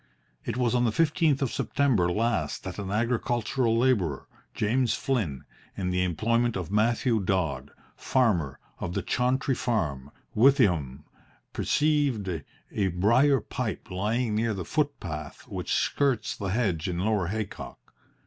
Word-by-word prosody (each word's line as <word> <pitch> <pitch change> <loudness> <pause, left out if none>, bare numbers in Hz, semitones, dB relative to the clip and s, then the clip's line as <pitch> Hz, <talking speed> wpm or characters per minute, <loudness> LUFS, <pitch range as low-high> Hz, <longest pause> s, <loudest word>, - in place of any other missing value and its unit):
It - - -3
was 125 -2 +1
on 125 -1 +2
the 115 - +2
fifteenth 155 0 +2
of 130 - -2
September 115 -12 +1
last 115 +3 -1
that 95 -1 -6
an 100 -2 -4
agricultural 115 +2 0
labourer, 105 - +1 0.3
James 120 +3 +1
Flynn, 100 - -1 0.3
in 90 -2 -1
the 90 0 +1
employment 115 +6 +1
of 90 -1 -5
Mathew 115 +2 +2
Dodd, 80 -9 -1 0.3
farmer, 90 - +1 0.2
of 90 - -4
the - - -1
Chauntry 130 +2 +1
Farm, 75 - -1 0.3
Withyham, 90 - +3 0.5
perceived 145 -9 +1 0.4
a 100 -2 0
briar 115 +10 +3
pipe - - -4
lying 110 +5 0
near 110 0 0
the 90 - -5
footpath 95 - -3
which - - -5
skirts 140 -5 +1
the 100 - -4
hedge 95 -6 0
in 85 - -2
Lower 100 -1 +1
Haycock. 105 +1 -6
110 Hz, 135 wpm, -27 LUFS, 90-125 Hz, 0.5 s, Withyham